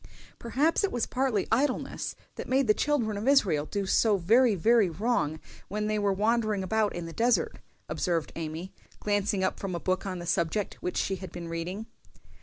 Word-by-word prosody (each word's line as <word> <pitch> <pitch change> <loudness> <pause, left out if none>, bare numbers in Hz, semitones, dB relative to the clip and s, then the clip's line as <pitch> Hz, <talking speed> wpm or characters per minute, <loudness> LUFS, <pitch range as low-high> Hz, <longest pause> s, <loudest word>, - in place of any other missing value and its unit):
"Perhaps 285 - +1
it 400 - +1
was 240 - 0
partly 255 -6 0
idleness 255 +3 0 0.2
that - - -7
made 265 +1 +3
the 215 - +5
children 235 -6 0
of 215 +5 -4
Israel 190 - +3
do 200 -1 -2
so 210 +2 +3
very 225 +5 +4
very 220 +2 +4
wrong 170 -5 0 0.3
when 210 +2 -2
they 215 0 0
were 205 -1 +2
wandering 215 0 +1
about 215 +2 0
in 175 -1 -4
the 165 - -7
desert," 245 - +1 0.3
observed 170 -4 -1
Amy, 165 +3 -5 0.3
glancing 205 -1 0
up 190 - -1
from 190 -3 -3
a - - -2
book 185 +2 -1
on 185 -1 -3
the 175 - -6
subject 170 +4 0
which 180 - -3
she 195 - 0
had 185 0 -8
been 170 -1 -7
reading. 175 +6 -4
205 Hz, 190 wpm, -28 LUFS, 180-235 Hz, 0.3 s, the